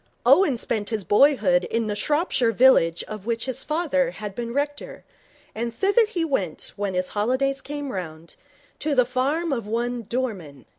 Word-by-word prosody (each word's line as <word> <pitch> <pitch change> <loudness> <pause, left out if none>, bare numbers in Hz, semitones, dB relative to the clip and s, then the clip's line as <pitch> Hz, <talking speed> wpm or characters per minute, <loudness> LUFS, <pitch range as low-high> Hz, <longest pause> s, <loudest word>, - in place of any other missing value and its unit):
Owen 350 -10 +5
spent 215 -2 -2
his 220 -3 -2
boyhood 270 +5 +3
in 230 0 -1
the 210 -1 -2
Shropshire 280 - +1
village 200 -9 +4
of 215 -1 -9
which 230 -1 -1
his 260 -2 -2
father 300 -4 0
had 210 -5 -7
been 235 +2 -5
rector, 290 +2 -4 0.5
and 235 +1 -4
thither 405 - +3
he 355 -6 -2
went 195 - -3
when 200 -2 -3
his 180 0 0
holiday 255 +6 0
came 290 -1 -5
round, 165 -4 -7 0.4
to 300 -2 -1
the 250 -2 +4
farm 275 +6 -1
of 230 -5 -4
one 240 +2 -2
Dorman. 190 - -4
245 Hz, 165 wpm, -24 LUFS, 210-285 Hz, 0.5 s, Owen